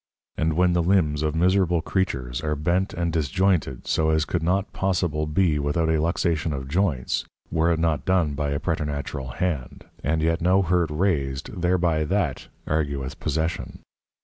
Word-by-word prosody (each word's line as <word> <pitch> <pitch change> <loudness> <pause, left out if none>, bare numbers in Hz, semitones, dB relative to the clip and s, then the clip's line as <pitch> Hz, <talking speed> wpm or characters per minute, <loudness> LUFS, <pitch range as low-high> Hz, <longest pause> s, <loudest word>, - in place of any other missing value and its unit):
And 80 0 0
when 90 +2 +3
the 85 - +2
Limbs 85 -5 +2
of 75 0 0
miserable 90 -1 +2
Creatures, 65 -11 -1
are 75 -1 -1
bent 85 +6 0
and 85 -2 -1
disjointed 80 -3 0
so 80 0 +1
as 80 0 +2
could 85 - -1
not 95 +4 0
possible 85 -5 0
be 75 -1 +2
without 75 +3 0
a 80 -1 +2
Luxation 80 -1 0
of 65 -1 -5
Joints, 75 -5 0 0.3
were 80 +1 +2
it 85 - +1
not 80 -2 +1
done 90 -6 +2
by 75 0 -2
a 70 0 -1
preternatural 70 -2 -3
Hand, 80 -9 -3 0.2
and 80 +2 0
yet 80 +1 +1
no 95 +3 +4
hurt 90 -2 +1
raised 75 -3 -1
thereby 85 -3 +2
that 85 -6 -1 0.2
argueth 70 -4 -2
Possession. 80 +4 -2
80 Hz, 165 wpm, -24 LUFS, 75-90 Hz, 0.3 s, no